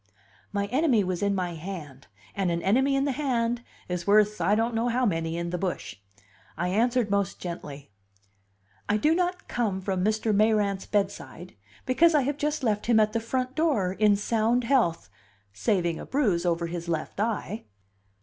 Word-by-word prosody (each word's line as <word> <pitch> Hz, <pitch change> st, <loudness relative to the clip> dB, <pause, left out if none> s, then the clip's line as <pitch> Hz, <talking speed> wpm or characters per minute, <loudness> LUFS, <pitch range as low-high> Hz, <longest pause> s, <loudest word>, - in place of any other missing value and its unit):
My 200 Hz, -1 st, -1 dB
enemy 260 Hz, -6 st, +3 dB
was 180 Hz, -1 st, -2 dB
in 200 Hz, 0 st, +1 dB
my 180 Hz, -2 st, -2 dB
hand; 155 Hz, -7 st, -8 dB, 0.3 s
and 195 Hz, -2 st, 0 dB
an 170 Hz, 0 st, -1 dB
enemy 265 Hz, +8 st, +3 dB
in 275 Hz, +1 st, +1 dB
the 285 Hz, -, +1 dB
hand 245 Hz, -4 st, -1 dB, 0.3 s
is 180 Hz, 0 st, -4 dB
worth 210 Hz, -1 st, +4 dB
I 195 Hz, +5 st, +3 dB
don't 230 Hz, +2 st, 0 dB
know 225 Hz, +2 st, 0 dB
how 245 Hz, +1 st, +1 dB
many 165 Hz, -4 st, -1 dB
in 170 Hz, 0 st, -3 dB
the 180 Hz, -, -2 dB
bush. 180 Hz, -, -4 dB, 0.6 s
I 175 Hz, -, -1 dB
answered 235 Hz, +2 st, +1 dB
most 200 Hz, -2 st, 0 dB
gently: 145 Hz, -, -7 dB, 1.0 s
"I 205 Hz, -, +3 dB
do 300 Hz, +9 st, +3 dB
not 360 Hz, +1 st, -1 dB
come 215 Hz, -6 st, -1 dB
from 190 Hz, -1 st, -2 dB
Mr. 215 Hz, +1 st, +1 dB
Mayrant's 205 Hz, -2 st, +2 dB
bedside, 195 Hz, -3 st, -3 dB, 0.3 s
because 320 Hz, +6 st, +4 dB
I 295 Hz, -, +5 dB
have 285 Hz, +2 st, -2 dB
just 300 Hz, -1 st, -1 dB
left 210 Hz, -3 st, 0 dB
him 235 Hz, -2 st, +5 dB
at 215 Hz, 0 st, +2 dB
the 230 Hz, -, +1 dB
front 255 Hz, +3 st, -2 dB
door 270 Hz, -, +1 dB
in 210 Hz, +1 st, +4 dB
sound 225 Hz, +4 st, +1 dB
health 230 Hz, -10 st, +1 dB, 0.5 s
saving 170 Hz, -, 0 dB
a -, -, -7 dB
bruise 200 Hz, -11 st, +1 dB
over 170 Hz, 0 st, 0 dB
his 170 Hz, 0 st, -5 dB
left 160 Hz, +3 st, -3 dB
eye." 215 Hz, 0 st, -2 dB
210 Hz, 180 wpm, -27 LUFS, 180-245 Hz, 1.0 s, I